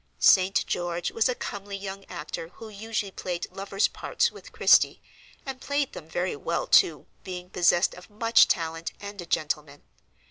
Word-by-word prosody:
St. 190 0 +5
George 175 0 -2
was 225 +3 +2
a 250 - 0
comely 200 -2 -5
young 195 0 -7
actor 155 +2 -6
who 225 - -10
usually 215 -1 -3
played 180 -2 -4
lovers' 195 +1 0
parts - - 0
with - - -13
Christie, - - +5 0.5
and 265 -2 -6
played 285 -1 -1
them 160 - -9
very 175 +2 -1
well, 165 +4 -2
too, 155 -4 +4 0.2
being 180 -1 -7
possessed 175 0 +3
of 180 +3 -13
much 225 +2 +5
talent, 165 -1 -2
and 200 -1 -7
a 175 - -9
gentleman. 150 -2 -2
190 Hz, 165 wpm, -27 LUFS, 170-205 Hz, 0.5 s, St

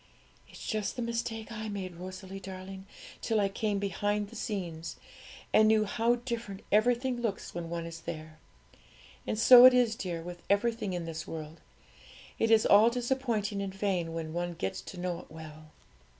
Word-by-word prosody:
'It's - - -10
just 215 -2 -2
the 245 - -3
mistake 230 -1 -3
I 220 -1 -5
made, 190 -3 -5
Rosalie 185 +2 -7
darling, 190 0 -8 0.3
till 225 -2 +1
I 200 -1 +2
came 205 +1 -1
behind 205 +1 -1
the - - -12
scenes, 170 -7 -4 0.6
and 215 - +6
knew 215 -1 +4
how 230 +3 +2
different 235 -5 -5
everything 245 +3 +2
looks 220 -5 -3
when 170 -1 -5
one 170 0 -3
is 165 0 -8
there. 155 -2 -7 0.9
And - - -1
so 245 +2 +9
it 255 0 +9
is, 240 -3 +3
dear, 175 -5 -4
with 175 0 -8
everything 205 -1 +1
in 175 -1 -3
this 165 -1 -6
world; 160 0 -7 0.8
it 225 - +2
is 225 -1 +5
all 210 +3 +7
disappointing 235 -5 -1
and 195 -1 -4
vain 190 -4 -1
when 160 -1 -5
one 175 0 -2
gets 95 - -3
to 180 - -9
know 175 -1 -2
it - - -13
well.' 155 -1 -11
200 Hz, 175 wpm, -30 LUFS, 175-225 Hz, 0.9 s, so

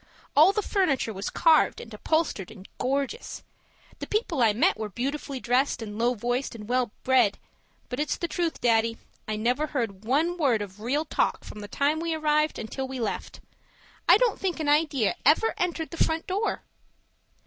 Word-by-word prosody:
All 315 +6 +7
the 420 +1 -1
furniture 295 - 0
was 195 +1 -4
carved 320 -2 +3
and 225 - -10
upholstered 285 - -1
and 200 -3 -12
gorgeous; 275 - -2 0.6
the - - -5
people 405 - -1
I 225 -2 +5
met 210 - +2
were 215 -1 -5
beautifully 275 +5 -4
dressed 250 +3 +1
and 210 -3 -6
low 240 +2 +2
voiced 245 +3 -2
and 210 -2 -9
well 250 -1 +1
bred, 250 -6 +3 0.5
but 250 - -5
it's 300 - -1
the 340 - -2
truth, 335 0 -2
Daddy, 230 -1 +2 0.3
I 215 - -1
never 250 +8 0
heard 225 -9 -3
one 315 +9 +1
word 245 -9 +2
of 195 0 -11
real 275 +8 -1
talk - - 0
from 210 - -9
the 205 - -7
time 290 +7 0
we 330 0 -1
arrived 305 0 +1
until 265 +4 -4
we 260 -1 -6
left. 225 -3 -4 0.7
I - - +9
don't - - +1
think 365 -3 -2
an 310 - -2
idea 290 -7 +2
ever 320 - +4
entered 340 -3 -2
the 335 - +1
front 320 0 -1
door. 405 +4 -2
270 Hz, 180 wpm, -26 LUFS, 230-320 Hz, 0.7 s, I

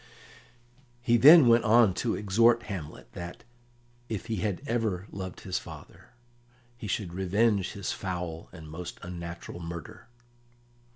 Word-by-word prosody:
He 120 -1 +3
then 145 +3 +9
went 115 0 +5
on 110 -3 +5
to 115 - 0
exhort 115 +4 +3
Hamlet 75 - -8
that, 85 0 -8 0.7
if 110 -2 -3
ever - - -13
he 115 - 0
had 105 -1 -2
loved 95 -2 -6
his 90 -2 -2
father, - - -13 0.6
he 115 -3 -8
should 95 -3 -3
revenge 100 +2 +1
his 100 -2 -4
foul 90 -3 -5
and 80 -3 -11
most 85 +3 -7
unnatural 85 0 -7
murder. 85 -2 -8
95 Hz, 130 wpm, -28 LUFS, 85-115 Hz, 0.7 s, then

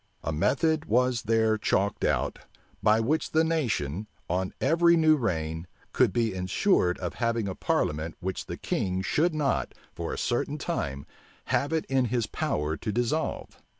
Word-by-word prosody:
A 80 - -2
method 150 - +1
was 125 +1 +2
there 110 0 +2
chalked 100 -1 0
out, - - 0 0.4
by 110 +1 +4
which 145 +8 0
the 160 +1 +4
nation, 110 - -1 0.2
on 95 +2 -1
every 170 +4 +4
new 155 -1 +5
reign, 80 - -2 0.3
could - - +4
be 115 -4 0
insured 90 - +1
of 90 -2 -4
having 115 -3 -1
a 95 - -2
parliament 80 -2 -1
which 95 +1 -4
the - - -5
king 95 0 -1
should 160 - +1
not, 145 -3 0 0.2
for 85 -1 -4
a - - -4
certain 135 +4 -1
time, 70 - -3 0.5
have 145 - +1
it 160 -1 0
in 135 -1 +1
his 120 -1 0
power 75 -6 -1
to 110 - -3
dissolve. 120 +8 -2
115 Hz, 160 wpm, -27 LUFS, 90-145 Hz, 0.5 s, new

